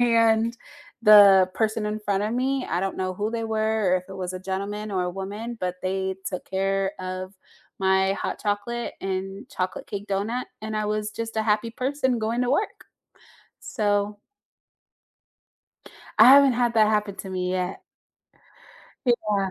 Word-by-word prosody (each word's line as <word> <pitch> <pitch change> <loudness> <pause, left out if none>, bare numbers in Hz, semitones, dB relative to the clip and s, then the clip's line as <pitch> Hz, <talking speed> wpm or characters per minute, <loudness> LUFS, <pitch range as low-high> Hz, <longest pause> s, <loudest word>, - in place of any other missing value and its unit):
and 230 -1 +3 0.5
the 200 -4 +8
person 220 -1 0
in 210 +1 -3
front 200 -1 -1
of 215 +2 -1
me, 260 +1 0
I 175 - 0
don't 195 0 -2
know 185 0 -2
who 210 +3 -2
they 230 0 -3
were, 220 -3 0
or - - +5
if 180 - -5
it 195 - -8
was 185 -1 -4
a 185 - -5
gentleman 200 +3 -4
or 185 -2 0
a 180 - -2
woman, 205 +6 -6
but 180 0 -2
they 190 0 -2
took 185 - -4
care 195 0 0
of 185 +1 -5 0.4
my 190 0 +2
hot - - -4
chocolate 215 +3 -2
and 195 +1 -4
chocolate 185 0 -4
cake 200 0 -6
donut, 210 +6 -1 0.2
and 215 0 -4
I 215 0 -1
was 210 0 -2
just 225 0 -6
a 220 - +2
happy 215 +1 +1
person 260 +1 -1
going 225 +2 -1
to 250 - 0
work. 350 +10 -1 0.8
So 205 -2 -1 2.0
I 220 - +9
haven't 275 0 +8
had 240 -1 +1
that 215 -1 +5
happen 210 -2 0
to 190 - -7
me 180 -1 -2
yet. 185 0 -3 1.2
Yeah. 210 -5 +1
210 Hz, 165 wpm, -25 LUFS, 190-225 Hz, 2.0 s, I